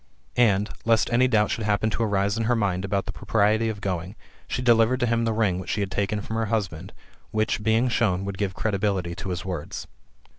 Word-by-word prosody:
And, 105 -3 +3 0.2
lest 115 0 +2
any 125 +2 +4
doubt 105 -4 +2
should 115 - -2
happen 105 +1 +1
to - - -2
arise 100 -2 +1
in 115 0 -1
her 120 +2 +2
mind 95 -4 0
about 100 0 -1
the 95 - -4
propriety 110 +2 +1
of 105 -2 -5
going, 95 0 -3 0.3
she - - -2
delivered 120 +1 +4
to - - +3
him 115 0 +1
the 115 - +1
ring 105 -5 +1
which 95 - -7
she 105 - 0
had 100 -1 -2
taken 105 +1 -1
from 110 +2 -4
her 115 -1 0
husband, 95 -5 -2 0.4
which, 110 +2 0
being 110 +3 +2
shown, 100 -6 +1
would 100 -1 -5
give 100 -2 -1
credibility 100 -4 -1
to 95 - -6
his 90 -1 -4
words. 90 -6 -5
105 Hz, 220 wpm, -25 LUFS, 95-115 Hz, 0.4 s, any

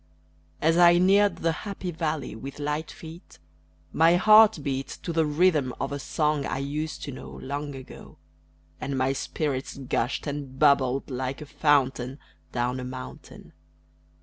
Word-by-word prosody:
As 165 +2 +4
I 175 0 +7
neared 200 +3 +4
the 165 - 0
happy 190 +2 -5
valley 160 -6 -3
with 135 +5 -8
light 150 +2 -3
feet, 165 +2 -12 0.6
My 165 +2 +5
heart 215 +3 +7
beat 135 -1 -2 0.2
To 170 - -3
the 160 -1 +2
rhythm 150 -4 +2
of 135 - -2
a 145 - -3
song 150 +1 0
I - - -3
used 145 +3 -4
to 145 - -5
know 130 - -9
Long 145 +1 -5
ago, 130 -1 -12 0.6
And 140 -1 -3
my 130 +1 +1
spirits 140 -1 -3
gushed 130 -2 -2
and 140 -3 -5
bubbled 140 -2 +3
like 130 +1 -3
a 150 - -8
fountain 140 -3 +1 0.3
Down 125 +1 -1
a - - -5
mountain. 65 - -9
145 Hz, 150 wpm, -26 LUFS, 135-160 Hz, 0.6 s, I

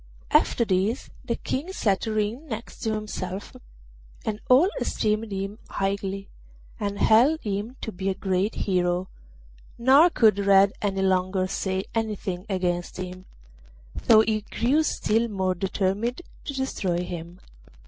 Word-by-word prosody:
After 235 - +3
this 200 +5 0
the 240 -3 -1
King 305 +8 -3
set 205 - 0
Ring 220 +7 -1
next 225 -3 -7
to 220 -1 -1
himself, 200 -2 -5 0.7
and 215 -1 -2
all 265 +8 +7
esteemed 215 0 -1
him 195 +2 -4
highly, 195 0 -2 0.5
and 200 -1 -2
held 255 +11 +4
him 210 +4 -3
to 220 - -4
be 195 0 -3
a 190 - -1
great 190 +2 0
hero; 180 -1 0 0.7
nor 270 +8 +6
could 220 - +4
Red 195 0 +5
any 195 -2 0
longer 185 0 +1
say 190 0 -2
anything 205 -4 -3
against 175 -2 -1
him, 185 0 -7 0.7
though 220 -2 +6
he 220 -1 0
grew 250 +8 +1
still 230 -6 +1
more 190 -4 0
determined 200 - -1 0.2
to 280 - -4
destroy 190 -10 -1
him. 175 0 -7
200 Hz, 135 wpm, -25 LUFS, 190-225 Hz, 0.7 s, all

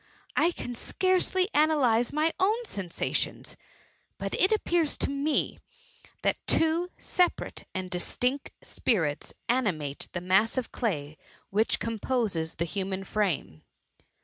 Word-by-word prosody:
I 335 - +5
can 245 -8 -5
scarcely 370 +7 +1
analyse 270 -7 +3
my 310 +2 +1
own 435 +5 +2
sensations; 190 - -2 0.6
but - - -4
it 375 - +3
appears 345 -7 +2
jto - - 0
me 280 +2 0 0.6
that - - +2
two 330 +2 +2
separate 360 -1 0
and 185 0 -2
dis< 180 -1 -4
tijict 260 +3 0
spirits 160 - 0
animate 185 - 0
the 175 - -1
mass 195 +6 +3
of 255 - -2
clay 155 - -2 0.3
which 215 +3 +3
THE - - -5
MUMMY. 230 - -1
87 - - -15
composes 200 -11 0
the 170 - -1
human 190 +2 -3
frame. 185 - -1
230 Hz, 135 wpm, -28 LUFS, -, 0.6 s, I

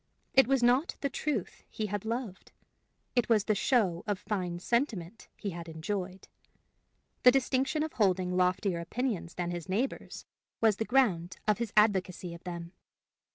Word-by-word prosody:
It 265 -3 +6
was 270 -2 +2
not 250 +7 +3
the 280 - -1
truth 275 - -3
he 215 - -3
had 205 0 -3
loved; 230 -4 -4 0.6
it 245 -2 +2
was 215 -3 +4
the 215 - +2
show 200 -6 +1
of 205 -2 0
fine 185 -4 -3
sentiment 220 - -2
he 200 - -4
had 170 -1 -7
enjoyed. 185 +3 -4 0.9
The 250 - +8
distinction 270 +3 +1
of 315 - -4
holding 185 -4 +1
loftier 180 0 +1
opinions 195 0 -3
than 175 -1 -2
his 175 +1 -6
neighbors 230 +8 -2 0.3
was 220 -3 +3
the 220 - -1
ground 205 -10 +2
of 210 0 +3
his 235 -3 -2
advocacy 190 -4 +2
of 170 - -11
them. 170 -1 -6
205 Hz, 155 wpm, -30 LUFS, 180-240 Hz, 0.9 s, The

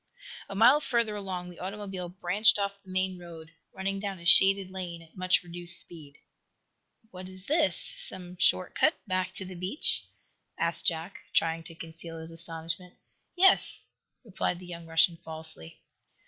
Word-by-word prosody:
A 195 - -7
mile 245 +8 +6
further 235 -6 -1
along 185 -3 -6
the 175 - -15
automobile 190 -2 -6
branched 190 +5 +2
off 200 0 -3
the 190 - -19
main 185 0 -2
road, 165 -2 -12 0.2
running 195 +1 -3
down 200 -1 -5
a 170 - -13
shaded 195 +1 +7
lane 180 -3 -6
at 160 - -22
much 185 0 +1
reduced 175 0 +2
speed. 150 -4 -7 0.9
"What 185 0 -10
is 185 0 -9
this 315 - +1
some 180 - -6
short 185 0 +4
cut 315 - +2
back 185 -2 -2
to 190 - -2
the 185 - -9
beach?" 185 - +1 0.5
asked 170 0 0
Jack, 165 +3 0 0.2
trying 165 0 +1
to 165 - -10
conceal 165 0 -9
his 160 +1 -10
astonishment. 165 +2 -4 0.4
"Yes," 375 +1 +6 0.4
replied 195 -5 -3
the 180 - -12
young 170 -1 -9
Russian, 165 +1 +3
falsely. 160 - -8
185 Hz, 160 wpm, -28 LUFS, 170-195 Hz, 0.9 s, shaded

